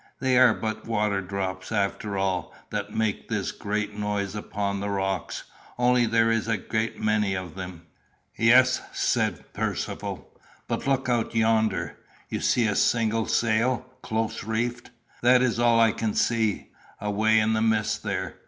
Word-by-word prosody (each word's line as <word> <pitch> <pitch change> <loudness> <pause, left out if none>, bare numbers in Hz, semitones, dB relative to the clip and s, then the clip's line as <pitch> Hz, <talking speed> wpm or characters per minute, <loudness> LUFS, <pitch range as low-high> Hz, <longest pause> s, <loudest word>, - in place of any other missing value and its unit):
"They 130 -1 +2
are 125 -3 +6
but 110 0 -4
water 105 -3 0
drops, 95 0 -4
after 100 -1 -1
all, 95 -2 -1 0.2
that 105 -1 -3
make 110 -2 -2
this - - -1
great 105 0 -3
noise 105 -1 -2
upon 100 -1 -3
the 100 +1 -3
rocks; 95 -1 -2 0.3
only 125 -1 +3
there 115 0 +3
is 115 0 0
a 115 -1 +1
great 110 +3 -2
many 105 -2 +1
of 90 -4 -5
them." 90 -3 -8 0.5
"Yes," 125 +3 +5
said - - -1
Percivale. - - -3 0.4
"But - - -3
look 135 -1 +1
out 120 -2 0
yonder. 110 -1 +1 0.3
You - - -2
see 120 - +2
a 105 -2 +1
single 115 -1 +2
sail, 120 +2 +1 0.2
close 110 0 -2
reefed 120 +3 -2 0.3
that 125 +1 +5
is 120 -2 +1
all 120 -1 +4
I 115 -1 +5
can 110 -1 -2
see 110 -3 +1 0.3
away 110 +2 +2
in 110 0 +3
the 110 - +1
mist 110 -1 +1
there? - - -3
110 Hz, 155 wpm, -26 LUFS, 100-115 Hz, 0.5 s, are